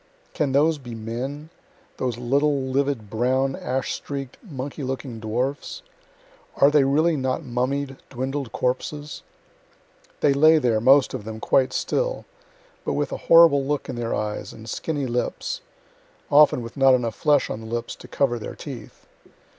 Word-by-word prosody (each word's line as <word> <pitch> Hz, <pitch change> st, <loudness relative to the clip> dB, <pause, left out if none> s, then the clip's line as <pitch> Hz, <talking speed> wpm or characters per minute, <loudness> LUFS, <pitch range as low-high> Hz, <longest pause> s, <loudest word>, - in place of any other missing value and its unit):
Can 145 Hz, -3 st, 0 dB
those 150 Hz, +3 st, +3 dB
be 120 Hz, -3 st, -8 dB
men 130 Hz, +8 st, -5 dB, 0.5 s
those 125 Hz, -3 st, -2 dB
little 140 Hz, +4 st, +1 dB
livid 130 Hz, -4 st, -1 dB
brown, 130 Hz, +5 st, 0 dB
ash 130 Hz, +1 st, -2 dB
streak'd, 135 Hz, -3 st, -6 dB
monkey 145 Hz, -, -7 dB
looking 130 Hz, -3 st, -4 dB
dwarfs? 130 Hz, -, -3 dB, 0.7 s
are 140 Hz, +1 st, +5 dB
they 150 Hz, -2 st, +5 dB
really 155 Hz, +5 st, +3 dB
not 130 Hz, +2 st, -1 dB
mummied, 135 Hz, +2 st, -2 dB
dwindled 135 Hz, 0 st, -4 dB
corpses? 145 Hz, +4 st, -3 dB, 1.0 s
They 140 Hz, -, +4 dB
lay 155 Hz, +3 st, +6 dB
there, 120 Hz, -7 st, +1 dB
most 135 Hz, +3 st, +5 dB
of 130 Hz, -5 st, -5 dB
them, 110 Hz, +1 st, -7 dB
quite 130 Hz, +3 st, +2 dB
still, -, -, -1 dB, 0.6 s
but -, -, -2 dB
with -, -, -1 dB
a -, -, -3 dB
horrible 165 Hz, -4 st, +7 dB
look 145 Hz, +1 st, -2 dB
in 130 Hz, -, -4 dB
their 120 Hz, -1 st, -2 dB
eyes 105 Hz, 0 st, -4 dB
and 110 Hz, 0 st, -12 dB
skinny 145 Hz, +2 st, -3 dB
lips 125 Hz, -, -2 dB, 0.7 s
(often 145 Hz, -4 st, +6 dB
with 115 Hz, -1 st, -9 dB
not 135 Hz, -1 st, +5 dB
enough 120 Hz, -3 st, -1 dB
flesh 145 Hz, +1 st, +2 dB
on -, -, -4 dB
the 110 Hz, -, -9 dB
lips 120 Hz, +1 st, -4 dB
to -, -, -12 dB
cover 120 Hz, -4 st, 0 dB
their -, -, -7 dB
teeth.) -, -, -10 dB
135 Hz, 155 wpm, -24 LUFS, 120-145 Hz, 1.0 s, horrible